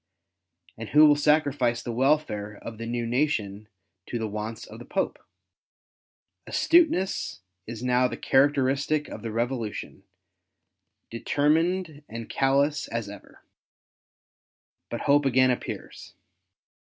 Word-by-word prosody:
And 110 - -6
who 150 +1 +7
will 150 -1 +6
sacrifice 145 -5 +1
the 120 - -4
welfare 115 -5 0
of 115 -1 -8
the 115 - -5
new 120 0 -2
nation 115 -6 -1 0.4
to 120 - -3
the 110 -1 -2
wants 110 +2 -5
of 110 - -12
the 120 - -10
Pope? 190 - -2 1.3
Astuteness 300 - +2 0.3
is 115 +1 -7
now 125 0 +3
the - - -6
characteristic 140 +2 +2
of - - -8
the 115 - -5
Eevolution, 115 -1 -3 1.1
determined 155 +6 0
and 115 0 -7
callous 140 +2 +1
as 115 -3 -4
ever. 100 -1 -13 1.5
But - - -4
hope 145 +1 +3
again 130 -1 +4
appears. 125 - -6
130 Hz, 115 wpm, -26 LUFS, 115-145 Hz, 1.5 s, who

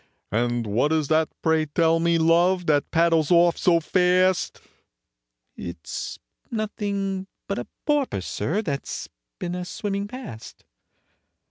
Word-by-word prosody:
"And 120 +1 0
what 115 +8 +1
is 155 -3 +1
that, 160 0 +3
pray 160 -1 +2
tell 165 +2 +2
me, 170 0 +3
love, 170 +3 +3
that 145 -2 +2
paddles 165 -2 +3
off 175 -1 +5
so 170 -2 +3
fast?" 180 +2 +2 1.0
"It's 85 -2 -6 0.3
nothing 200 -3 -2 0.2
but - - -2
a - - -6 0.2
porpoise, 285 - 0
sir, 170 - -1
that 140 -7 -3
's - - -5 0.3
been 175 -1 -4
a 180 0 -3
swimming 200 +2 -3
past." 215 - -9
170 Hz, 130 wpm, -24 LUFS, 155-190 Hz, 1.0 s, off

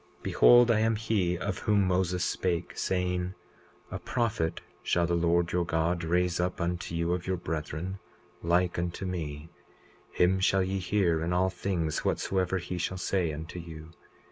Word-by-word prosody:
20:23 - - -25
Behold, 120 -1 +6
I 110 - +3
am 110 0 +2
he 105 -5 0
of 95 +1 -3
whom 105 -2 +2
Moses 90 -1 +1
spake, 90 -2 -2
saying: 90 0 -1 0.6
A - - -4
prophet 110 -9 -1 0.2
shall 85 0 +1
the 85 - -1
Lord 85 0 +2
your 90 0 +1
God 85 +1 0
raise 90 +1 +1
up 90 +1 -1
unto 85 -1 -2
you 85 +1 0
of 90 0 -3
your 95 -1 0
brethren, 80 +3 -4 0.4
like 85 +1 +1
unto 85 +2 -3
me; 80 -4 -5 0.6
him 95 +2 +2
shall 95 0 +3
ye 95 +1 -2
hear 90 -4 +1
in 85 +2 -1
all 95 +1 +2
things 85 -4 -2
whatsoever 95 -1 0
he 90 0 -4
shall 95 +2 -2
say 90 -2 0
unto 80 +3 -7
you. 80 -1 -10
90 Hz, 170 wpm, -29 LUFS, 85-95 Hz, 0.6 s, Behold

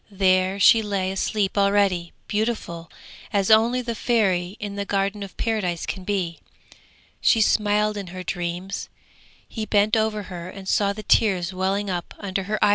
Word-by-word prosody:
There 190 -1 +2
she 225 +3 +7
lay 195 -3 -1
asleep 195 0 -1
already, 200 -4 +2 0.2
beautiful 210 -7 -2 0.4
as 200 -1 +1
only 235 +3 +4
the 235 -1 -3
Fairy 200 -5 0
in 205 -1 -5
the 200 - -2
Garden 200 +1 -1
of 195 -2 -8
Paradise 195 -7 -1
can 190 - -5
be. 180 -4 -2 0.8
She 225 - +4
smiled 210 0 +2
in 200 -2 -5
her 185 +1 -7
dreams; 180 +2 -4 0.6
he 220 -2 -5
bent 210 +1 +3
over 220 -1 0
her 180 -2 -7
and 190 0 -10
saw 200 +1 +2
the 215 +1 -7
tears 190 -4 +2
welling 190 +2 -1
up 175 -1 -5
under 195 -1 -3
her 215 - 0
eyelashes. - - +4
200 Hz, 165 wpm, -23 LUFS, 185-210 Hz, 0.8 s, she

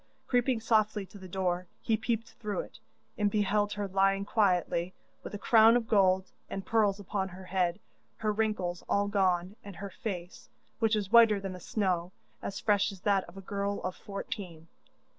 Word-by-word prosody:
Creeping 245 -1 +2
softly 215 -2 +1
to 200 - -14
the 190 - -10
door, 180 -1 -1
he 225 - +1
peeped 225 +1 -2
through 210 -3 -2
it, - - -13 0.4
and 205 -1 +3
beheld 205 0 +1
her 205 -1 -3
lying 195 +1 +2
quietly, 185 -4 +1 0.3
with - - -7
a - - -3
crown 225 +2 +6
of 230 -2 -3
gold 190 -3 +3 0.2
and 195 -1 -5
pearls 210 -3 +2
upon 195 -1 -2
her 185 +1 -11
head, 180 -2 0 0.4
her 215 -1 0
wrinkles 205 -5 -1
all 200 0 +2
gone, 190 -1 +1
and 200 -2 -9
her 195 +4 -7
face, 180 -5 -6 0.3
which 225 -1 +3
was 205 -2 -2
whiter 225 -3 +7
than 195 -1 -5
the 180 - -8
snow, 180 -2 -1 0.3
as 195 - -4
fresh 205 -1 +2
as 195 -2 -12
that 200 -2 +2
of 170 +3 -14
a - - -7
girl 200 +1 -2
of 185 0 -3
fourteen. 195 -6 -7
200 Hz, 180 wpm, -30 LUFS, 185-215 Hz, 0.4 s, whiter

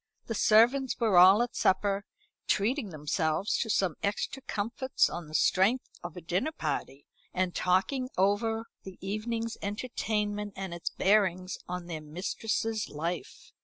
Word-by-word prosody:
The 230 - -3
servants 240 +5 +4
were 220 -5 +2
all 190 +6 +8
at 240 - -6
supper, 200 +1 +1 0.4
treating 225 +3 +1
themselves 155 +3 -1
to 225 - -1
some 190 -5 +2
extra 205 +6 -2
comforts 235 +4 0
on 170 -2 -6
the 155 - -7
strength 195 - +3 0.2
of 175 0 -7
a - - -6
dinner 180 - -1
party, 145 - -4 0.3
and 185 -1 0
talking 255 +9 +1
over 220 +4 +1 0.2
the 190 -1 -10
evening's 225 +3 -3
entertainment 210 -1 -2
and 190 -2 -5
its 170 - -3
bearings 190 -2 +1
on 180 0 -4
their 165 -3 -5
mistress's 215 +7 -2
life. 165 +4 -5
200 Hz, 140 wpm, -29 LUFS, 180-225 Hz, 0.4 s, all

